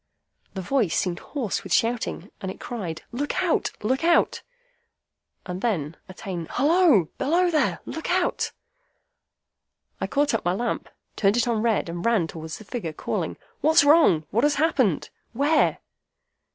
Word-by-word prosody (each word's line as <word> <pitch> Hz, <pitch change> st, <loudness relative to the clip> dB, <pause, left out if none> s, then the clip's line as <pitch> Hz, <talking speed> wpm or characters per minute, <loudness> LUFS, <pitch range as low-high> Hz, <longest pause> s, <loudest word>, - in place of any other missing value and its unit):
The 190 Hz, -, -4 dB
voice 225 Hz, -5 st, +1 dB
seemed 180 Hz, -1 st, -1 dB
hoarse 255 Hz, -9 st, -3 dB
with -, -, -9 dB
shouting, 230 Hz, +1 st, 0 dB
and 190 Hz, -, -4 dB
it 190 Hz, -, -8 dB
cried, 185 Hz, -10 st, -5 dB
'Look 290 Hz, +8 st, -2 dB
out! 350 Hz, -, +1 dB
Look 260 Hz, +7 st, 0 dB
out!' 340 Hz, 0 st, +3 dB, 1.0 s
And 180 Hz, +1 st, -5 dB
then 165 Hz, -10 st, -1 dB
again, 180 Hz, -3 st, -6 dB
'Halloa! 295 Hz, -, +4 dB
Below 350 Hz, +5 st, +2 dB
there! 310 Hz, -, +1 dB
Look 320 Hz, -, -5 dB
out!' 355 Hz, 0 st, 0 dB, 1.5 s
I -, -, -2 dB
caught 290 Hz, -1 st, +1 dB
up 225 Hz, -, 0 dB
my 175 Hz, -, +1 dB
lamp, 235 Hz, +5 st, -2 dB, 0.3 s
turned 200 Hz, +2 st, +2 dB
it 240 Hz, -, +2 dB
on 230 Hz, -3 st, +1 dB
red, 225 Hz, -5 st, +1 dB
and 170 Hz, +1 st, -5 dB
ran 230 Hz, -7 st, +2 dB
towards 160 Hz, -1 st, -7 dB
the -, -, -12 dB
figure, 200 Hz, -7 st, -5 dB
calling, -, -, -3 dB, 0.2 s
'What's 315 Hz, -1 st, +5 dB
wrong? 285 Hz, -, +5 dB
What 230 Hz, +4 st, +1 dB
has 295 Hz, 0 st, +3 dB
happened? 275 Hz, -, +1 dB, 0.2 s
Where? 290 Hz, +5 st, +2 dB
235 Hz, 150 wpm, -25 LUFS, 185-290 Hz, 1.5 s, What's